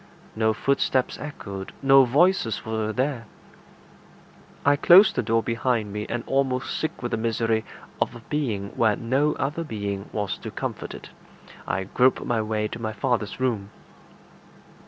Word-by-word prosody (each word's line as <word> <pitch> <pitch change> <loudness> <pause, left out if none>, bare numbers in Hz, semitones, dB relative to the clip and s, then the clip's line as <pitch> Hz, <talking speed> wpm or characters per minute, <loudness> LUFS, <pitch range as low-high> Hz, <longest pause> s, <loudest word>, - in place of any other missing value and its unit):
No 110 0 +2
footsteps 130 +2 0
echoed; 100 -10 -7
no 135 0 +7
voices 140 - +2
were 110 -1 -2
there. 125 0 -2 1.4
I 145 0 +5
closed 180 +7 +7
the - - +1
door 115 0 +1
behind 115 -3 -1
me, 105 0 -4
and, 120 -1 -2
almost 135 -1 0
sick 155 - -3
with 120 - -2
the - - 0
misery 115 0 0 0.4
of - - 0
a 120 - -10
being 115 -10 -2
where 110 -3 +3
no 135 +7 +1
other 145 +5 -2
being 100 -7 -4
was 105 -2 -3
to - - -6
comfort - - -5
it, - - -11 0.6
I 95 - -1
groped 125 +7 +2
my 115 -2 0
way 105 0 -1
to 115 - -7
my 110 -1 -3
father's 110 -1 -1
room. 115 -6 -1
115 Hz, 155 wpm, -25 LUFS, 110-135 Hz, 1.4 s, no